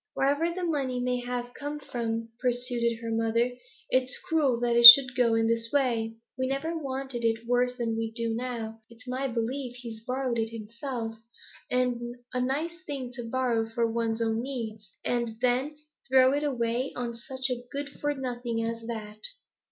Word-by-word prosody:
'Wherever 290 +5 +1
the 365 +1 -5
money 275 -7 -1
may 250 0 0
have 245 0 -4
come 290 +1 -5
from,' 230 -4 -4
pursued 245 -2 0
her 230 - -3
mother, 225 +2 +1 0.4
'it's 255 0 +2
cruel 285 -7 +1
that 240 -1 +1
it 235 0 +12
should 255 0 +12
go 235 -2 +3
in 225 0 +2
this 230 0 0
way. 235 -5 0 0.2
We 260 - +1
never 275 +5 -2
wanted 265 -5 -4
it 225 0 0
worse 245 +1 +1
than 230 -2 -1
we 225 0 -2
do 230 0 -1
now. 225 -2 -5
It's 235 +2 -15
my 260 +2 -2
belief 245 +1 -3
he's 235 -3 -8
borrowed 255 -1 -2
it 225 0 -1
himself; 230 +1 -6 0.5
a 245 0 -2
nice 315 +7 -2
thing 270 -4 -4
to 240 -2 -6
borrow 235 -3 0
for 230 +1 0
one's 230 0 -1
own 225 0 0
needs, 220 -6 -6
and 235 -2 -1
then 255 +4 0 0.3
throw 260 0 +5
it 290 +1 0
away 245 -2 -1
on 240 -1 -4
such 260 +2 -3
a 245 -1 -2
good 285 0 -4
for 290 0 0
nothing 240 -3 -3
as 230 0 -3
that.' 215 -2 -7
245 Hz, 175 wpm, -28 LUFS, 230-260 Hz, 0.5 s, it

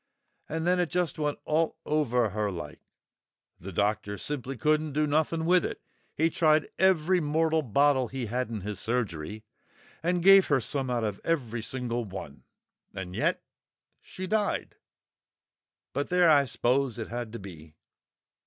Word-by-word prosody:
And 160 +1 -2
then 180 +1 +3
it 175 -3 +1
just 175 -4 -1
went 150 -1 -1
all 160 +1 +1
over 125 -7 +1
her 105 +1 -1
like. 85 -6 -7 0.8
The 95 +3 -8
doctor 105 +2 -1
simply 135 +3 -4
couldn't 155 +3 +1
do 150 +1 +2
nothing 155 +2 0
with 180 +1 +4
it. - - -4 0.4
He 165 +1 +2
tried 155 -2 +3
every 185 -1 +4
mortal 160 +1 +1
bottle 135 +1 +2
he 130 0 -4
had 125 +2 -2
in 110 -3 -4
his 100 0 -5
surgery, 105 -4 -3 0.6
and 175 +1 0
gave 195 0 +8
her 145 -3 +3
some 130 +2 -2
out 120 -2 0
of 105 -3 -3
every 120 -9 -1
single 120 0 -3
one, 95 -8 -9 0.5
and 95 -1 -6
yet - - 0 0.6
she 185 - -7
died! 210 +1 -1 1.2
But 140 +2 -1
there, 180 -2 +5
I 140 -2 +5
s'pose 125 0 0
it 110 - -5
had 120 -1 -4
to - - -4
be!" 80 -6 -11
135 Hz, 155 wpm, -28 LUFS, 110-160 Hz, 1.2 s, gave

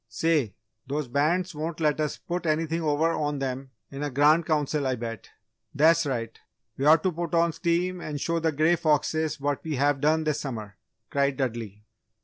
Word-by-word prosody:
"Say, 135 - 0 0.3
those 145 +1 -2
Bands 170 +8 +1
won't 160 +2 -4
let 155 -2 +1
us 150 - -2
put 175 0 -4
anything 160 +1 0
over 155 +1 +2
on 150 -2 -1
them 135 0 -4 0.2
in 140 0 -6
a 145 - -1
Grand 150 +4 +4
Council, 150 -2 0
I 130 - 0
bet!" 115 -3 -6 0.5
"That's 160 +2 +4
right! 115 -4 -3 0.4
We 135 - -2
ought 160 +1 +6
to 185 - +2
put 170 0 -3
on 170 0 +3
steam 175 +2 -1
and 150 -3 -4
show 165 +3 0
the 165 0 +1
Grey 155 +4 +3
Foxes 155 0 +1
what 145 0 -2
we 155 -2 -3
have 140 +1 +1
done 155 +2 +3
this 155 -1 0
summer!" 110 -8 -6 0.4
cried 140 -1 +1
Dudley. 115 -6 -4
150 Hz, 185 wpm, -26 LUFS, 135-165 Hz, 0.5 s, ought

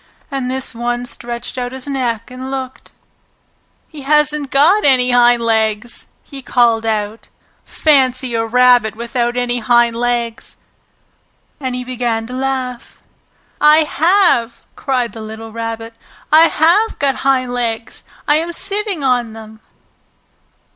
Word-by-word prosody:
And 270 -2 -3
this 260 0 -3
one 240 +1 -3
stretched 240 +1 -6
out 245 0 -4
his 265 -1 -7
neck 250 -5 -3
and 255 +1 -7
looked. 260 -1 -6 1.0
"He 305 -3 -11
hasn't 300 0 +1
got 325 +11 +4
any 255 -2 +3
hind 240 -1 +4
legs!" 220 0 -1 0.2
he 275 -2 -10
called 230 -3 +2
out. 215 0 -3 0.4
"Fancy 260 -4 +1
a 225 0 0
rabbit 245 -1 +3
without 240 +1 -2
any 245 0 -1
hind 235 0 +2
legs!" 235 -1 -3 1.0
And 260 -3 -3
he 250 - -4
began 240 -3 -2
to 250 - -9
laugh. 260 -1 -4 0.6
"I 300 +1 +6
have!" 310 - +2
cried 250 -5 -2
the 225 - -8
little 220 +1 -8
Rabbit. 225 0 -5 0.4
"I 320 +2 +7
have 355 +10 +2
got 275 -2 0
hind 255 -2 0
legs! 230 -2 -3 0.3
I 295 0 +4
am 335 +2 -2
sitting 400 -3 -1
on 245 -4 0
them!" 220 0 -12
250 Hz, 135 wpm, -16 LUFS, 230-275 Hz, 1.0 s, I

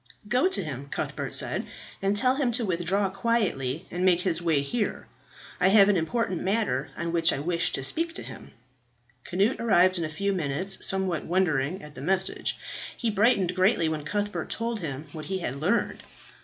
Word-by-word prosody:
"Go 250 - +3
to 380 - 0
him," 140 -3 -6
Cuthbert - - -3
said, - - 0 0.4
"and 195 +1 +1
tell 255 +5 +3
him 265 -4 +1
to 235 0 0
withdraw 185 +2 0
quietly 190 - 0
and 180 +1 -2
make 180 -2 +4
his 175 -3 +2
way 160 -4 +2
here. 210 +10 -2 0.5
I 180 - +4
have 200 0 +6
an 205 - +4
important 185 +1 -1
matter 195 - 0
on 170 0 -2
which 165 -1 +3
I - - -1
wish 170 +4 0
to 135 - -1
speak 330 - 0
to - - -5
him,'" - - -11 0.8
Cnut 200 +8 +1
arrived 185 -5 +4
in - - -1
a 155 - -2
few 200 +5 -1
minutes, 180 +3 -1
somewhat 190 -5 +1
wondering 170 -2 0
at 150 -1 -11
the 130 - -9
message. 190 +5 0 0.4
He 230 -2 0
brightened 200 -3 +3
greatly 185 -2 +3
when 155 -2 -3
Cuthbert 205 +6 -3
told 230 0 -2
him 150 -4 -5
what 155 0 -7
he 190 +5 -2
had 140 -7 -4
learned. 180 +11 0
185 Hz, 185 wpm, -27 LUFS, 160-205 Hz, 0.8 s, have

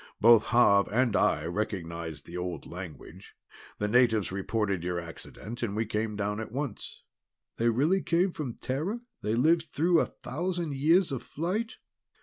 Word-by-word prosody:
Both 115 -1 +7
Xav 100 -5 +4
and 120 -1 +2
I 75 - +2
recognized 85 -5 -4
the 85 - -10
old 90 0 -4
language; 85 -5 -10 0.4
the 105 - -1
natives 110 -3 +3
reported 100 -1 -1
your 90 0 -1
accident, 95 +7 -9
and 105 -4 -2
we 110 +1 0
came 110 0 -2
down 105 +1 -2
at 110 - -6
once." 135 -3 -5 0.5
"They 115 +1 +2
really 150 +12 +2
came 180 +3 +2
from 140 -8 -5
Terra? 160 - -3 0.2
They 105 +1 0
lived 160 +6 +3
through 165 +4 +2
a - - +1
thousand 175 0 -3
years 165 +6 +3
of 135 - -3
flight?" 195 +9 -3
115 Hz, 155 wpm, -29 LUFS, 100-155 Hz, 0.5 s, Both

